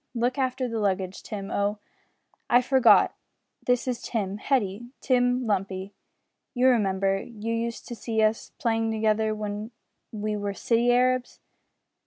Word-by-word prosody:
Look 245 +3 0
after 260 -1 0
the 230 -2 -3
luggage, 190 -2 -1
Tim 200 -2 -6
Oh! 205 +1 0 0.7
I 245 +1 +5
forgot. 255 -4 +5 0.5
This 250 +1 +2
is 250 -2 -2
Tim, 200 -4 -2
Hetty 230 -3 -1
Tim 250 -1 +2
Lumpy. 195 -2 -2 0.6
You 255 +1 +5
remember, 195 -4 +1
you 230 -1 -5
used 230 0 -3
to 240 - -5
see 225 -1 -3
us 215 +1 0
playing 225 -1 0
together 220 0 +1
when 210 0 -4 0.4
we 215 -1 -3
were 205 -1 -3
city 235 +3 +2
Arabs." 255 0 +1
225 Hz, 140 wpm, -26 LUFS, 205-245 Hz, 0.7 s, I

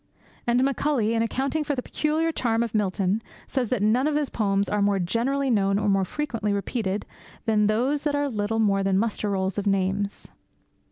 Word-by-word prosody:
And 240 +2 +3
Macaulay, 270 -4 +1
in 225 - +1
accounting 270 +6 -1
for 290 -1 -1
the 250 - -3
peculiar 315 +2 0
charm 230 -6 0
of 230 - -4
Milton, 200 0 0 0.2
says 255 -5 -1
that 235 -5 0
none 240 +7 +3
of 305 - 0
his 295 -3 0
poems 200 -2 +1
are 210 - 0
more 200 0 +3
generally 250 +9 0
known 195 -3 +2
or 210 0 0
more 195 -1 +3
frequently 230 -4 -2
repeated 200 0 -2 0.4
than 215 -2 +3
those 255 +7 +1
that 290 -1 +1
are 285 0 +1
little 220 -3 -2
more 200 -3 +2
than 195 -1 +2
muster 215 0 0
rolls 190 0 -1
of 205 - -3
names. 195 +1 0
220 Hz, 190 wpm, -25 LUFS, 200-265 Hz, 0.4 s, And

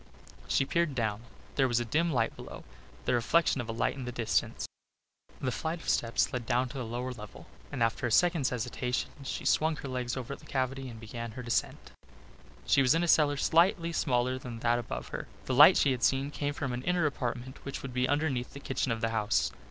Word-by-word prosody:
She 135 - +2
peered 170 -1 0
down. 110 -3 -1 0.4
There 135 -2 +4
was 120 -1 +2
a 120 - -2
dim 165 +8 +1
light 120 -5 +1
below - - -9 0.4
the - - +1
reflection 130 +3 +2
of 115 - -8
a - - 0
light 115 - 0
in 135 -2 -6
the 125 - -4
distance. 115 -3 0 0.7
A 130 - -1
flight 160 +8 -3
of - - -12
steps 115 0 +1
led 125 -3 -3
down 125 0 +1
to 135 - -6
the 125 - -3
lower 120 +3 -3
level 105 -5 -10 0.3
and 115 - 0
after 115 +2 0
a - - -3
second's 170 0 +3
hesitation 125 +1 -2
she 135 - -4
swung 160 +1 +3
her 140 - -7
legs 125 -1 -3
over 130 +2 -4
the - - -17
cavity 135 0 -2
and 115 -2 -9
began 115 0 -6
her 125 - -7
descent. 120 -1 -2 0.7
She 140 - +4
was 130 +2 +4
in 165 - +2
a - - 0
cellar 145 -3 +4
slightly 170 +2 +3
smaller 130 -4 +1
than 125 -3 -7
that 120 0 +2
above - - -5
her. - - -5 0.2
The 130 - -1
light 150 +8 +9
she 140 - +4
had 125 -2 -2
seen 135 +4 +2
came 145 0 -2
from 135 -4 -3
an 120 - -3
inner 180 +3 +1
apartment 130 -2 -3
which 140 - -6
would 135 -2 -6
be 125 0 +1
underneath 145 -4 0
the 140 - -8
kitchen 135 -3 -2
of 115 -1 -2
the 115 - +1
house. 105 - +1
130 Hz, 220 wpm, -30 LUFS, 120-145 Hz, 0.7 s, light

